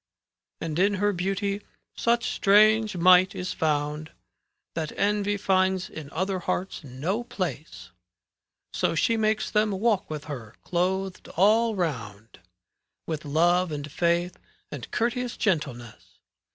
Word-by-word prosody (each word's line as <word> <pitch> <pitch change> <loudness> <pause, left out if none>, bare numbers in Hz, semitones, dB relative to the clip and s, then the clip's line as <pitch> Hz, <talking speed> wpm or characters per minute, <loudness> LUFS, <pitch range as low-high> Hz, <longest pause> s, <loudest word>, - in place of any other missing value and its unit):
And 165 0 -3
in 200 +2 +3
her 205 +1 +1
beauty 195 +2 -2 0.3
such 235 +1 +1
strange 215 0 +4
might 185 +1 +6
is 180 0 -3
found, 150 -1 -1
^ - - -26 0.6
That 160 -2 -3
envy 205 0 +1
finds 190 -1 +1
in 150 -3 -8
other 185 +4 -2
hearts 180 0 -3
no 150 - -3
place; - - -5 0.8
So - - 0
she 230 -2 +2
makes 215 -1 0
them 215 0 +2
walk 205 0 0
with 155 -2 -5
her, 120 -8 -8
clothed 185 +1 -1
all 220 +4 +4
round 115 - -4 0.7
With 155 -2 -4
love 175 +4 +2
and 145 -1 -5
faith 170 +2 0 0.3
and - - -7
courteous 240 +1 -1
gentleness. 140 - -3
185 Hz, 125 wpm, -26 LUFS, 155-205 Hz, 0.8 s, might